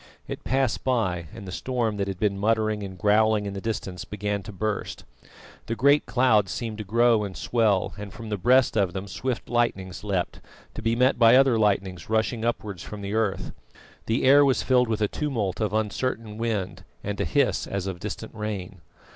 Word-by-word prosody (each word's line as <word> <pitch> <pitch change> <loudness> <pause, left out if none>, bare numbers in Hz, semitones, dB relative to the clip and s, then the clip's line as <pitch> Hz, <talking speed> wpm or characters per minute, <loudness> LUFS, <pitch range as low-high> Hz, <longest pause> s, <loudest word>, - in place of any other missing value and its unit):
It - - -6
passed 130 -2 0
by, 95 -10 0
and 100 - -10
the - - -6
storm 115 +1 -1
that 100 -1 -1
had 95 -2 -4
been 105 -2 +1
muttering 110 0 +1
and 95 -2 -7
growling 105 +1 +3
in 100 - -4
the 100 - -5
distance 95 -4 -4
began 105 -1 -3
to 95 - -9
burst. 105 +2 -3 0.6
The 115 - -1
great 140 +4 +4
clouds 110 -7 +3
seemed 110 -3 -4
to - - -3
grow 115 +1 +3
and 100 -2 -6
swell, 110 -5 +1
and 105 -1 -7
from 115 +2 -9
the 105 - -1
breast 125 +4 +4
of 95 -5 +1
them 95 +1 -5
swift 125 +5 -3
lightnings 100 -6 -1
leapt, 95 -4 -2 0.3
to - - -6
be 115 +1 +1
met 125 +1 +3
by 115 0 +7
other 135 -2 +5
lightnings 100 -4 0
rushing 110 +1 0
upwards 105 -6 -2
from 105 -1 -8
the 100 +1 -4
earth. 110 -3 -1 0.6
The 115 +2 +1
air 140 +2 +7
was 135 -2 +2
filled 125 -1 +3
with 110 -1 -1
a 105 - +3
tumult 110 -9 -2
of 105 - 0
uncertain 110 +1 -2
wind 110 -5 -2 0.2
and 100 0 -3
a - - +2
hiss 80 - +1
as 100 -2 -3
of 95 -2 -4
distant - - -6
rain. 105 -4 -5
110 Hz, 195 wpm, -25 LUFS, 100-115 Hz, 0.6 s, by